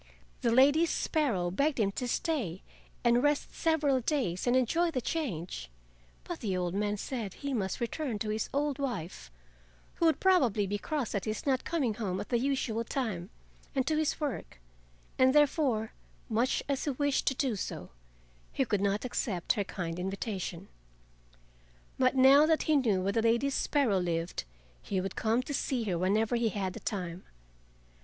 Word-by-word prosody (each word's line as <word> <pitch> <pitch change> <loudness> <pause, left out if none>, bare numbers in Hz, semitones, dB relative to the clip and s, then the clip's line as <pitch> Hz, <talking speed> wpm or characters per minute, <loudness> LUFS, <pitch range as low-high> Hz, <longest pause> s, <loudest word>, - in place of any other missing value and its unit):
The 235 - +2
Lady 285 +7 +5
Sparrow 235 - 0
begged 280 - +1
him 200 -2 +2
to 250 +5 -3
stay 235 - -2 0.4
and 240 0 +4
rest 290 +1 +1
several 300 -5 +2
days 245 - -1
and 245 - +4
enjoy 330 +8 +2
the 270 - -1
change, 185 - -3 0.5
but 345 - -6
the 195 -6 -1
old 180 -1 -1
man 205 +1 0
said 220 -3 -4
he 280 -1 -4
must 190 -6 -1
return 240 0 -2
to 215 +1 -3
his 215 0 -2
old 285 0 -1
wife—who - - -7
would 320 - +2
probably 255 - +3
be 205 +1 -2
cross 290 -3 -2
at 200 - -2
his 215 0 -3
not 265 -3 +1
coming 275 -10 0
home 200 -4 -3
at - - -6
the 240 - +2
usual 250 -4 0
time—and 230 - -4
to 310 - +1
his 310 -1 0
work, 280 - -4 0.6
and 260 +2 +5
there 295 0 +8
fore, 250 -8 -1 0.4
much 235 +4 +1
as 280 -2 -1
he - - 0
wished 285 +1 0
to 270 - +3
do 255 -4 0
so, 90 - -5 0.6
he 270 - 0
could 205 -4 0
not 200 +3 0
accept 200 -7 -1
her 205 - -1
kind 175 -3 -5
invitation. 190 -1 -4 1.3
But 255 0 +3
now 270 +3 +7
that 320 -1 +2
he 310 - +2
knew 215 -9 +2
where 200 +1 0
the 225 - +2
Lady 235 +5 +2
Sparrow 265 -8 +1
lived 170 - -2 0.4
he 195 - -2
would 190 0 -4
come 225 +3 +1
to 285 - -5
see 260 -3 -1
her 190 -5 -1
whenever 215 +6 +2
he 235 -1 +1
had 190 -3 -3
the - - -7
time. 180 -3 -4
230 Hz, 175 wpm, -30 LUFS, 195-275 Hz, 1.3 s, there